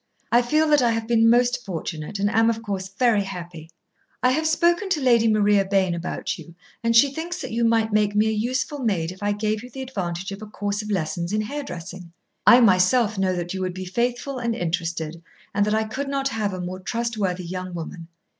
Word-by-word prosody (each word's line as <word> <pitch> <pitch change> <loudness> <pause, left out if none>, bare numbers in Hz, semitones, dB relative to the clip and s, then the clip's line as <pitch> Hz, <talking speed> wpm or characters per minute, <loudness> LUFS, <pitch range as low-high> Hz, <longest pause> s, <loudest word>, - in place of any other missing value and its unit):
I 240 - +6
feel 305 +6 +2
that 295 -2 +5
I 240 - +3
have 225 0 -2
been 230 -1 +4
most 245 +1 +3
fortunate, 165 -1 -5
and 200 +1 +1
am, 225 +2 +3
of 225 0 -2
course, 195 -3 -3
very 210 +2 +2
happy. 175 -4 -8 0.5
I 250 - +5
have 315 +4 +1
spoken 345 +5 +2
to 340 - +1
Lady 235 -4 +4
Maria 210 -2 +4
Bayne 190 -2 +1
about 170 +1 -4
you, 170 - -12 0.3
and 230 0 +2
she 270 +4 +6
thinks 345 +4 -4
that - - -6
you 235 +1 0
might 225 -1 +2
make 210 -1 +2
me 210 +1 +4
a 220 - +1
useful 255 +6 -1
maid 190 -9 0
if 185 - -13
I 205 0 +1
gave 210 +1 -1
you 250 - -10
the 265 +2 -6
advantage 190 -6 -4
of 195 +1 -7
a 215 - -7
course 205 0 -3
of 210 - -8
lessons 170 -2 -2
in 215 - +1
hairdressing. 185 - -6 0.4
I 245 - +9
myself 205 +2 +4
know 185 -1 +1
that 175 0 -3
you 190 - -4
would 185 -1 -3
be 185 0 -5
faithful 245 +7 -2
and 235 -2 -1
interested 165 -2 -3 0.3
and 205 +1 +2
that 210 - +2
I 220 - +2
could 260 +6 -4
not 275 0 -1
have 215 -4 -1
a 185 - -5
more 180 +1 -5
trustworthy 200 -4 -2
young 185 +1 -5
woman. 165 0 -7
210 Hz, 220 wpm, -23 LUFS, 185-240 Hz, 0.5 s, I